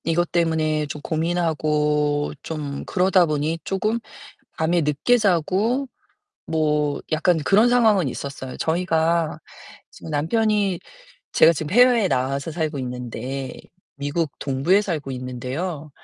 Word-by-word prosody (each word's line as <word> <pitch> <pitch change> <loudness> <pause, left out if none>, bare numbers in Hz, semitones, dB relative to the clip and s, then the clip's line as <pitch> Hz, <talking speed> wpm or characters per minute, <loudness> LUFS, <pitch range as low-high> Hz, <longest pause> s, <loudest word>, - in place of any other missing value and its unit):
이것 170 +1 0
때문에 160 -3 +1
좀 150 +1 -7
고민하고 150 -3 0
좀 145 -3 -5
그러다 185 -1 +3
보니 155 +2 -1
쪼금 215 +4 -1 0.6
밤에 170 +2 +2
늦게 150 +11 +2
자고 210 - +1 0.6
뭐 150 -2 0
약간 165 +2 +2
그런 205 +9 +4
상황은 220 - +4
있었어요. 130 0 -6
저희가 165 -1 0 0.5
지금 160 - -11
남편이 200 +4 +1 0.5
제가 165 - +6
지금 155 0 -5
해외에 245 -3 +5
나와서 135 +4 -1
살고 155 -2 -2
있는데 125 +1 -5 0.4
미국 145 +2 -2
동부에 145 +9 +2
살고 155 -9 -3
있는데요. 130 +6 -5
160 Hz, 260 characters per minute, -22 LUFS, 145-180 Hz, 0.6 s, 제가